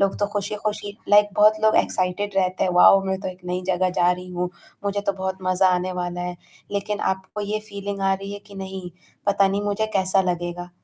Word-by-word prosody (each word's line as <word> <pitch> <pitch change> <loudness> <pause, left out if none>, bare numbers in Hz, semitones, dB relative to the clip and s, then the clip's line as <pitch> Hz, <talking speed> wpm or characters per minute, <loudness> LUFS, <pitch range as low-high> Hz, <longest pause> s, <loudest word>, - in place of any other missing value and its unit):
लोग 195 -1 +1
तो 205 - +1
खुशी-खुशी 205 0 -3
लाइक 205 0 +6
बहुत 215 +1 +5
लोग 220 0 +4
एक्साइटेड 185 +2 0
रहते 185 -1 +1
हैं, 185 - +1
वाओ! 195 +2 +7
मैं 190 0 -1
तो 190 - -3
एक 180 - -8
नई 180 +1 -2
जगह 185 0 +1
जा 175 +1 +5
रही 180 0 -7
हूँ, 180 0 -2 0.3
मुझे 200 0 0
तो 200 - +3
बहुत 190 0 -4
मज़ा 185 +1 +3
आने 180 +1 -1
वाला 175 0 -4
है। 180 0 -4 0.4
लेकिन 205 +1 -2
आपको 190 +2 -9
ये 215 0 -1
फीलिंग 200 0 -5
आ 195 0 +2
रही 195 +1 -6
है 205 - -5
कि 200 - -13
नहीं 190 -2 -6 0.4
पता 200 -1 +4
नहीं 200 +1 -1
मुझे 205 +1 0
कैसा 190 0 +3
लगेगा। 175 0 -4
195 Hz, 215 wpm, -23 LUFS, 180-205 Hz, 0.4 s, वाओ